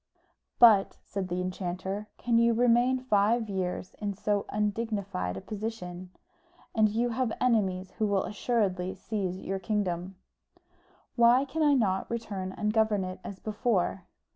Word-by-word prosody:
"But," 215 -5 +6
said 195 -2 -4
the 180 0 -2
enchanter, 185 +2 -4
"can 235 -1 +2
you 235 0 +4
remain 245 +2 +4
five 225 -2 +2
years 185 -2 -3
in 205 -2 -3
so 205 0 -1
undignified 205 - -2
a - - -6
position? 200 -4 -6 0.6
And 215 -1 +4
you 235 +3 0
have 240 0 -1
enemies 195 -7 +1
who 215 - +2
will 200 -2 +1
assuredly 195 -4 -1
seize 195 -4 -3
on - - -11
your 195 0 -2
kingdom." 190 -2 -2 1.0
"Why 240 +3 +5
can 315 +4 -3
I 295 -2 +5
not 195 -7 +1
return 200 -5 -4
and 210 0 -1
govern 220 -3 +2
it 185 0 -6
as 200 - -7
before?" 205 -3 -1
210 Hz, 145 wpm, -29 LUFS, 185-230 Hz, 1.0 s, But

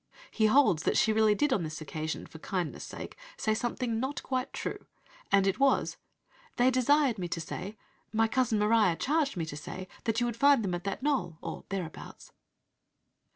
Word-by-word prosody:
He 220 -2 +3
holds 215 - +4
that - - +1
"she 220 - +4
really 215 -1 +4
did 290 +5 +2
on 205 - +1
this 155 -1 -5
occasion, 155 +1 -4
for 160 - -12
kindness' 180 -1 -3
sake, - - -8 0.2
say 220 - +1
something 235 0 -2
'not 265 +4 -3
quite 260 0 -2
true,'" - - -5 0.4
and 195 -1 +5
it 195 +5 +1
was: 275 -1 +2 0.6
"They 250 +2 +4
desired 255 -2 +3
me 180 - -2
to 170 - -3
say 185 +6 -6 0.3
my 225 +1 +3
cousin 235 -1 +1
Maria 210 -4 +3
charged 290 - 0
me 165 - -1
to 150 - -7
say, 185 +5 -7 0.2
that 225 0 +1
you 240 - +1
would 240 -2 -2
find 280 -2 +5
them 185 -3 -1
at 175 +1 -4
that 200 +6 -3
knoll, 270 - 0
or - - -7
thereabouts." 185 -5 -6
220 Hz, 190 wpm, -30 LUFS, 180-255 Hz, 0.6 s, and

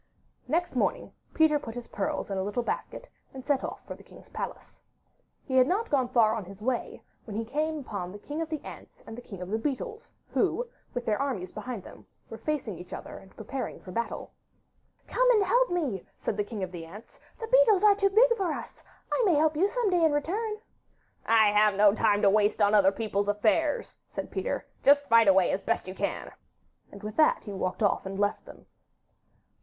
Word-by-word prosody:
Next 340 +6 -1
morning - - 0 0.2
Peter 315 -2 +3
put 230 -5 -8
his 245 -1 -6
pearls 200 0 -3
in 195 - -2
a - - 0
little 205 +5 -2
basket, - - -4 0.3
and 260 -1 -8
set 285 -3 +1
off - - -6
for - - -6
the - - -14
king's - - -16
palace. - - -7 0.6
He 260 - -3
had 255 0 +6
not 415 +5 -1
gone 265 -4 +2
far 220 -3 +4
on 220 -2 -3
his 195 +2 -12
way 245 +3 -3 0.2
when 210 - -7
he 225 +1 -2
came 310 +6 -1
upon 200 -10 -5
the 205 - -8
King 290 +9 -5
of 325 - -3
the 310 -2 -3
Ants - - -11
and 225 - -8
the 245 - -8
King 195 -6 -8
of 180 - -8
the 220 - 0
Beetles, 435 - -4 0.2
who, - - +1 0.3
with 245 -1 -3
their 215 +2 0
armies 220 -11 -3
behind 215 -2 -6
them, - - -14 0.2
were 225 - -7
facing 255 - -3
each 180 - -10
other - - -8
and 190 - -19
preparing 260 +5 -5
for 185 - -11
battle. 235 +5 -4 0.7
'Come - - +2
and 435 -5 +5
help - - +3
me,' 290 - -2
said - - -3
the 205 - 0
King 205 -1 -6
of 185 - -4
the 175 -2 -7
Ants; 200 +8 -13 0.2
'the 455 -1 -6
beetles 470 -6 +5
are 420 -1 +7
too 395 0 +2
big 470 +4 +5
for 380 -6 -1
us. - - -8 0.3
I - - +2
may 370 -7 +4
help 310 +1 +3
you 365 +6 +3
some 460 -2 0
day 350 -2 +3
in 315 -2 +4
return.' 425 +9 -2 0.7
'I 220 -2 +5
have 210 -1 +4
no 205 0 +6
time 210 -2 +2
to - - +7
waste 210 +1 +2
on 205 0 +4
other 195 -2 +6
people's 205 -1 -2
affairs,' 230 +9 +1
said - - -6
Peter; - - -3 0.2
'just 285 0 +5
fight 230 -1 +6
away 190 -2 +5
as 195 - -1
best - - -1
you 185 - -5
can;' - - -3 0.6
and 200 +1 -12
with 210 0 -6
that 310 - +4
he 205 - -7
walked 185 +2 -2
off 200 -1 +1
and 195 0 -5
left 205 +1 0
them. - - -14
240 Hz, 215 wpm, -28 LUFS, 205-320 Hz, 0.7 s, are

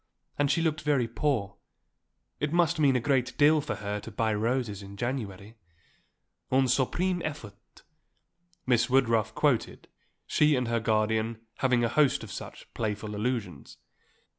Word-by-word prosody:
And 145 -1 +2
she 165 +3 +2
looked 155 -2 0
very 140 -5 +1
poor. 115 -6 -1 0.8
It 150 0 -1
must 170 -1 +2
mean 140 -3 +4
a - - +3
great 130 0 0
deal 150 +1 +5
for 145 - -4
her 105 0 -4
to 110 - -9
buy 110 +1 0
roses 110 -1 -1
in 100 0 -11
January 110 -3 -4 0.9
un 135 +1 +4
suprême 170 +8 +1
effort," 110 -8 -8 0.8
Miss 120 -1 +2
Woodruff 115 -4 +2
quoted, 140 -6 0 0.4
she 150 -1 +3
and 125 -2 -1
her 115 0 +1
guardian 110 0 0 0.2
having 125 -2 +2
a - - +3
host 140 +1 +2
of 110 - -9
such - - -9
playful 105 -1 -3
allusions. 105 - -4
120 Hz, 145 wpm, -28 LUFS, 110-140 Hz, 0.9 s, deal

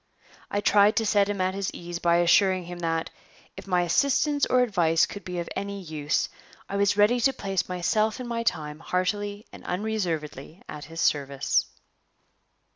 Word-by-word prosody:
I 205 - -1
tried 205 +1 +4
to 225 - +1
set 205 -1 +3
him 205 -1 -2
at 185 0 0
his 195 0 -2
ease 175 0 -6
by 170 0 +3
assuring 185 +2 +4
him 175 0 -8
that, 165 -1 -2 0.4
if - - -10
my 180 -2 +2
assistance 280 - +2
or 255 - +3
advice 170 -8 +2
could 205 - -9
be 180 -1 -5
of 170 - -3
any 200 0 -4
use, 155 -4 -1 0.4
I 200 - -5
was 200 0 +2
ready 210 +4 +4
to 270 +3 +3
place 195 -7 -2
myself 215 +5 0
and 250 - -5
my 235 -1 -2
time 155 -9 -2
heartily 205 +4 -2
and - - -12
unreservedly 175 -6 -3
at 150 -1 -8
his 165 +2 -6
service. 140 -2 +1
185 Hz, 175 wpm, -26 LUFS, 170-205 Hz, 0.4 s, tried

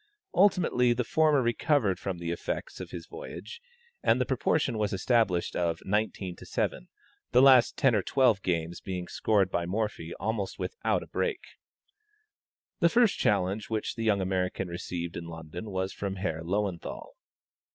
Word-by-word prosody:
Ultimately 170 -11 +4
the 125 +1 -1
former 150 +1 +3
recovered 120 - +1
from 95 -2 -3
the 85 -1 -3
effects - - -4
of - - -7
his - - -7
voyage, 470 +1 -9 0.4
and - - +3
the - - +2
proportion 115 -5 0
was 105 -1 0
established 95 -3 +1
of 85 -2 0
19 100 -3 -1
to - - -12
7, - - -2 0.5
the 125 - +7
last 130 -3 +6
ten 130 -3 +4
or 105 - +3
twelve 120 -3 +3
games 85 -1 -2
being 90 -2 -4
scored 100 -4 +1
by 85 0 -1
Morphy 100 -4 -2
almost 110 -3 -3
without 460 - -1
a - - -13
break. 425 -6 -1 1.4
The 170 - +5
first 235 +2 +3
challenge 100 +1 +1
which 110 -1 -2
the 115 - -4
young 105 -3 +2
American 95 0 -1
received 85 0 -5
in 85 - -5
London 85 +4 -7
was 95 -1 -2
from 100 -1 -4
Herr 85 -4 -3
Löwenthal. 95 0 -3
100 Hz, 160 wpm, -29 LUFS, 90-125 Hz, 1.4 s, the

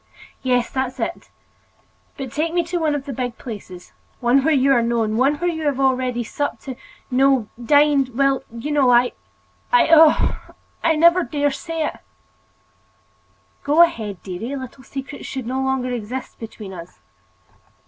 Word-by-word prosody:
"Yes, 250 -2 +1
that's 260 0 -3
it. 240 +9 -4 0.9
But 265 -3 -6
take 320 +4 -2
me 345 - +3
to 350 +2 -3
one 310 -2 +1
of 280 -1 -4
the 275 - -5
big 245 -1 -4
places, 190 -6 -9 0.3
one 255 +2 +3
where 320 - +2
you 275 -2 +3
are 240 - +3
known, 230 -2 0
one 270 +5 +3
where 350 +3 -1
you 320 -1 -5
have 275 -2 0
already 255 -2 +1
supped—no—dined—well, 270 +1 0
you 235 +6 -5
know—I—I—oh! 295 - +2 0.3
I 330 - +4
will - - -2
never 340 +3 +5
dare 290 -4 0
say 320 +3 -3
it!" - - -5 1.6
"Go 300 +4 +6
ahead, 220 - -2
dearie. 210 +9 -5
Little 260 0 -8
secrets 275 +2 -8
should 265 -3 -5
no 260 +3 -2
longer 265 -1 -1
exist 245 +2 -5
between 215 -3 -9
us." 170 -1 -10
265 Hz, 140 wpm, -21 LUFS, 240-290 Hz, 1.6 s, Go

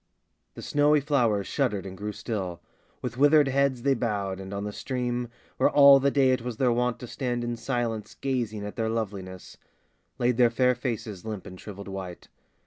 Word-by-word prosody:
The - - -9
snowy 145 +1 +3
flowers 120 -9 +1
shuddered 115 -9 -1
and 95 -1 -7
grew 105 +2 -4
still; 95 -6 -4 0.4
With 125 0 -4
withered 145 0 +6
heads 135 -2 +1
they 140 - +3
bowed, 100 -6 -2
and 95 0 -8
on 100 0 -4
the 105 0 -4
stream 125 -1 -3 0.3
Where - - +4
all 140 -1 +8
the 140 +1 +2
day 135 -2 +3
it 130 -1 +1
was 120 -2 -5
their 125 0 +3
wont 125 0 0
to 125 - -6
stand 120 -1 -3
In 120 0 -2
silence 115 -2 -3
gazing 115 -6 -2
at 105 - -7
their 110 -1 0
loveliness 100 -5 -5 0.6
Laid 125 -1 +1
their 120 -2 +5
fair 125 +2 +3
faces 110 -6 -4
limp 105 -4 -6
and 95 -2 -9
shriveled 100 -1 -9
white. 95 -2 -7
120 Hz, 190 wpm, -27 LUFS, 105-130 Hz, 0.6 s, all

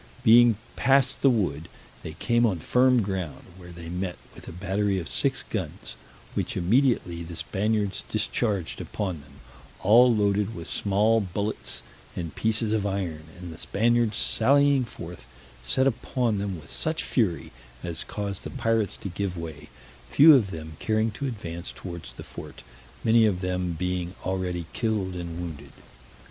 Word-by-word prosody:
Being 120 -1 +7 0.2
passed 135 -1 +3
the 135 - +6
wood, 90 - 0 0.3
they 80 - -7
came 120 +8 +1
on 105 -7 +2
firm 125 +7 +3
ground, 95 -5 -4
where 90 -1 -11
they 85 -1 -9
met 90 +1 -3 0.2
with - - -13
a - - -6
battery 95 +3 0
of 85 -4 -4
six - - -1
guns, - - -5 0.4
which - - -2
immediately 95 -3 +2
the 85 0 -7
Spaniards 105 +2 -1
discharged 105 -4 -1
upon 95 -7 -4
them, - - -18 0.5
all 120 +6 +7
loaded 105 0 +1
with 85 -2 -7
small 105 +3 +2
bullets 100 +2 -3 0.3
and 85 -3 -4
pieces 110 0 +1
of 110 -2 +1
iron; 95 -6 -3
and 90 -2 -8
the 80 - -10
Spaniards 115 0 +1
sallying 140 +2 +3
forth, 85 -6 -10 0.3
set 130 - +3
upon 125 -3 0
them 100 -4 -3
with 75 -2 -12
such 160 0 0
fury, 105 -10 0 0.3
as 85 -2 -3
caused 100 -2 -5
the - - -5
pirates 115 -4 0
to - - -6
give 95 0 -3
way, 80 -3 -7 0.4
few 155 +2 +8
of 110 -7 +2
them 80 -3 -7
caring 110 0 +1
to 140 +6 -4
advance 85 -8 -5
towards 85 -9 -8
the - - -8
fort, - - -10 0.4
many 115 0 +5
of 95 -3 -1
them 90 -1 -1
being 90 +1 -2
already 90 -2 -2
killed 105 -5 -1
and 85 -1 -5
wounded. 75 -5 -7
100 Hz, 155 wpm, -26 LUFS, 85-115 Hz, 0.5 s, few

